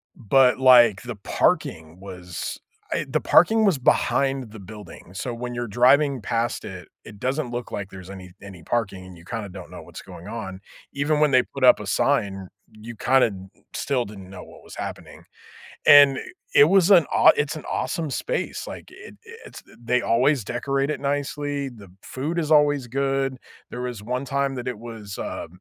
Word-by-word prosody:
but, 125 +1 +3
like, 120 -6 +6
the 120 -1 -6
parking 80 -4 -1
was 90 -3 -7 0.3
I - - -1
the - - 0
parking 220 +5 +4
was 190 -7 +3
behind 135 -1 +1
the 110 - -11
building. 100 -3 -12
So 120 +6 -4
when 120 +1 -6
you're 120 0 -4
driving 130 +4 +3
past 115 +3 -2
it, 95 -2 -9 0.2
it 105 -2 -13
doesn't 130 +1 -2
look 120 0 -5
like 100 -2 -5
there's 95 -1 -11
any 95 -2 -10
any 95 -5 -12
parking, 100 -5 -3
and 90 -2 -13
you 85 - -17
kinda 105 -1 -5
don't 90 -1 -10
know - - -9
what's - - -11
going 85 - -12
on. 95 -4 -7 0.3
Even 145 +2 0
when 150 -2 +3
they 130 -1 +5
put - - -2
up - - +7
a - - -7
sign, 95 -2 0 0.2
you 110 +2 -11
kinda 125 -1 +2 0.4
still 130 -4 -1
didn't 100 -2 -11
know 95 - -10
what - - -16
was - - -12
happening. - - -8 0.6
And 140 -2 +8 0.4
it - - +8
was 190 +3 +3
an 175 -6 +7
awe - - +7
it's 150 +1 -1
an 155 - -8
awesome 160 -3 -2
space. - - -3
Like, - - -9
it 385 +1 -13 0.3
it's - - -12 0.2
they 120 +1 0
always 130 +2 +2
decorate 135 +5 -2
it - - -3
nicely. 145 0 -2
The 105 -7 -14
food 155 +6 -4
is 155 -1 -4
always 145 -4 +3
good. 135 0 -1 0.3
There 125 - -6
was 125 -4 -5
one 125 +4 -3
time 140 -1 -1
that 125 0 -6
it 120 -4 -5
was, 110 -4 -9
uh, - - -5
125 Hz, 185 wpm, -23 LUFS, 100-140 Hz, 0.6 s, And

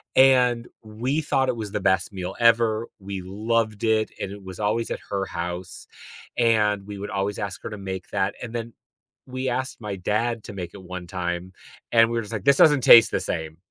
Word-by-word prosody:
and 125 -3 +5 0.2
we 120 +8 -2
thought 135 -3 +1
it 125 - 0
was 105 -3 -5
the 105 - -2
best 95 0 +1
meal 90 -2 -5
ever, 115 -1 +3
we 95 -1 -6
loved 110 +2 -1
it, 110 -1 +2
and 95 - -3
it 100 0 -10
was 95 -1 -9
always 110 +2 0
at - - -3
her 100 -1 -1
house, 90 0 -6 0.5
and 105 -4 +2
we 105 -1 -7
would 100 - -5
always 100 +1 -2
ask 95 -3 -4
her - - -4
to 105 - -6
make 95 -1 -6
that, 95 0 0
and 120 -1 -7
then 115 0 -4 0.6
we 130 0 -3
asked 130 +1 -3
my 105 -2 -4
dad 110 +4 -1
to 105 - -8
make 90 -3 -6
it 100 - -10
1 90 0 -7
time, 90 0 -3 0.4
and 115 -1 +5
we're 115 0 0
just 110 +1 -8
like, 105 -4 -3
"This 140 0 +5
doesn't 145 -3 +6
taste 115 -2 +9
the - - 0
same." 80 0 -4
105 Hz, 210 wpm, -24 LUFS, 95-115 Hz, 0.6 s, taste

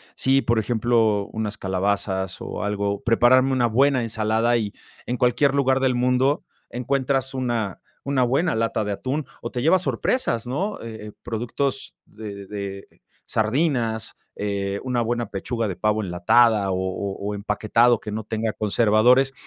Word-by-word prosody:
sí, 135 +1 +2
por 115 -1 +2
ejemplo, 110 -2 +1
unas 110 -1 -3
calabazas 95 0 -1
o - - -5
algo, 100 -1 -1
prepararme 130 +3 +4
una 125 -2 +2
buena 130 +3 +3
ensalada, 110 +1 +1
y 105 -3 -3 0.3
en 125 - -1
cualquier 125 +3 +2
lugar 135 -1 +3
del 130 -1 +1
mundo 125 +3 +2 0.3
encuentras 130 +2 -1
una 120 -6 -2 0.2
una 140 -2 +1
buena 140 +8 +1
lata 115 -1 0
de 105 - -3
atún, 135 +8 -3 0.2
o - - -5
te 125 - -3
llevas 175 +4 +4
sorpresas, 125 - 0
¿no? 190 +12 -2
Eh, 110 -2 -8
eh - - -8
productos 120 +4 -3
de 105 -2 -9
de 100 -1 -6 0.4
sardinas, 115 -1 0 0.2
eh, 100 -1 -2
una 125 -2 0
buena 120 +1 -1
pechuga 115 +3 -3
de 95 - -3
pavo 105 0 +1
enlatada, 100 +4 +3
o - - 0
o 95 +1 -3
o 105 +1 -3
empaquetado 110 +4 +2
que 105 - -7
no 110 +1 -4
tenga 110 0 -2
conservadores. 115 +5 +3
115 Hz, 155 wpm, -23 LUFS, 105-130 Hz, 0.4 s, prepararme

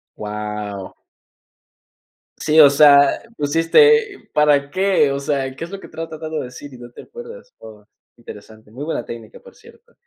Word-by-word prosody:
Guau. 105 -2 -6 1.4
Sí, 155 +1 +1
o 145 - +9
sea, 140 -1 +5 0.2
pusiste, 400 - +2
¿para 145 -2 +2
qué? 190 -7 +1
O 140 - -3
sea, 140 -2 -3
¿qué 165 - -6
es 175 - -14
lo 195 - -7
que - - -13
estás 165 +1 -7
tratando 155 0 -7
de - - -5
decir, 130 +3 -11
y 125 - -12
no 120 0 -12
te - - -13
acuerdas? 475 +2 -12
Oh, 105 -2 -14 0.3
interesante, 110 -1 -14
muy 135 +5 -8
buena 155 -7 -4
técnica, 115 -2 -10
por - - -18
cierto. - - -21
145 Hz, 165 wpm, -19 LUFS, 120-165 Hz, 1.4 s, o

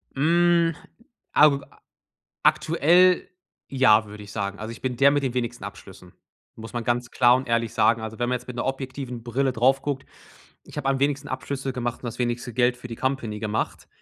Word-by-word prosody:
Hm, 170 +3 +3 0.6
ag 145 -2 +5 0.8
aktuell 175 +3 +4 0.4
ja, 115 -5 +4
würde 105 0 -10
ich 100 - -11
sagen. 100 -1 -3
Also, 110 +1 -5
ich 115 - -11
bin 125 -2 -2
der 140 +3 +6
mit 145 0 +1
den 130 -3 -1
wenigsten 120 -3 -3
Abschlüssen, 95 -2 -11 0.4
muss 115 +1 -10
man 120 -1 -3
ganz 120 +1 -1
klar 120 -1 +5
und 130 +1 -3
ehrlich 115 -1 0
sagen. 110 +1 +3
Also, 110 0 -6
wenn 120 - 0
man 125 - +1
jetzt 125 - -17
mit 125 - -7
'ner - - -2
objektiven 130 -2 -4
Brille 130 +3 0
drauf 130 +3 +2
guckt, 140 -2 -3 0.6
ich - - -14
habe 135 -2 0
am 135 -1 0
wenigsten 140 +1 0
Abschlüsse 135 -1 -4
gemacht 120 -1 -3
und - - -8
das 115 - -6
wenigste 120 0 -2
Geld 125 +2 +2
für 125 - -9
die 115 - -7
Company 120 -5 -2
gemacht. 110 0 -3
125 Hz, 195 wpm, -24 LUFS, 115-135 Hz, 0.8 s, der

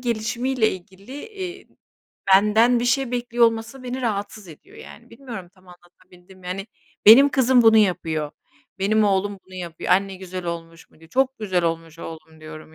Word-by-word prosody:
gelişimiyle 235 +1 -1
ilgili, 190 +5 -12 0.2
eee, 380 -3 -8 0.7
benden 220 +4 +4
bir 240 - -1
şey 260 0 +1
bekliyor 240 -1 +1
olması 225 +3 -4
beni 255 +1 -5
rahatsız 205 -3 -4
ediyor, 155 - -15
yani. 235 +3 -13
Bilmiyorum, 230 -8 -9
tam 185 -1 -24
anlatabildim 180 +1 -19
mi? 180 - -13
Yani 195 +3 -5 0.4
benim 270 +6 +9
kızım 260 -2 +3
bunu 225 -1 +6
yapıyor, 160 -7 +1 0.5
benim 215 +3 +2
oğlum 200 0 0
bunu 185 - -15
yapıyor, 175 -3 -6
"Anne 195 +1 +1
güzel 185 -1 -7
olmuş 165 -1 -7
mu?" - - -24
diyor. 165 0 -18
"Çok 265 0 0
güzel 185 -5 -1
olmuş 165 -1 -3
oğlum." 160 -1 -10
diyorum. 155 0 -11
200 Hz, 165 wpm, -22 LUFS, 175-240 Hz, 0.7 s, benim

